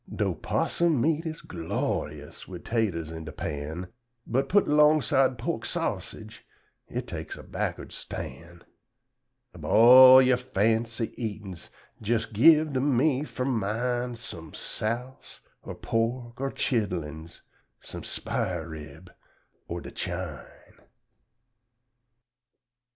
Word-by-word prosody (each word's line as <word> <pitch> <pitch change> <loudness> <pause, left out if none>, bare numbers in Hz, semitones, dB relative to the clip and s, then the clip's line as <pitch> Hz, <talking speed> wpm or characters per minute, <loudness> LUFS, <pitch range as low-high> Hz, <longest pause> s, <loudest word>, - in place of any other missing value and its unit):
'Dough - - -1
'possum 170 -5 0
meat 160 +5 +1
is 160 0 -6
glo'yus 85 -3 -4
wid 90 -2 -9
'taters 95 -9 -1
in 80 0 -7
de 80 - -7
pan, 75 +5 -5 0.4
But 135 +3 0
put 205 +1 +4
'longside 150 -3 +4
pork 115 - -3
sassage - - -4 0.4
it - - -4
takes - - -6
a - - -10
backward - - -4
stan'; 85 +5 -8 0.9
Ub 85 - -12
all 130 +8 +9
yer 130 -1 +4
fancy 115 -1 0
eatin's, 100 -5 -6 0.3
jes 110 +1 +1
gib 155 +7 +5
to 130 - +1
me 140 +1 +2
fur 130 -4 -4
mine 120 +1 -1
Sum 80 -8 -9
souse 120 +4 -5 0.2
or - - -8
pork 120 +2 -2
or 135 - 0
chidlins, 85 - -3 0.4
sum - - -9
sphar 85 -3 -3
rib, 75 -2 -10 0.6
or - - -4
de - - -9
chine. 85 -7 -7
115 Hz, 110 wpm, -27 LUFS, 85-130 Hz, 0.9 s, all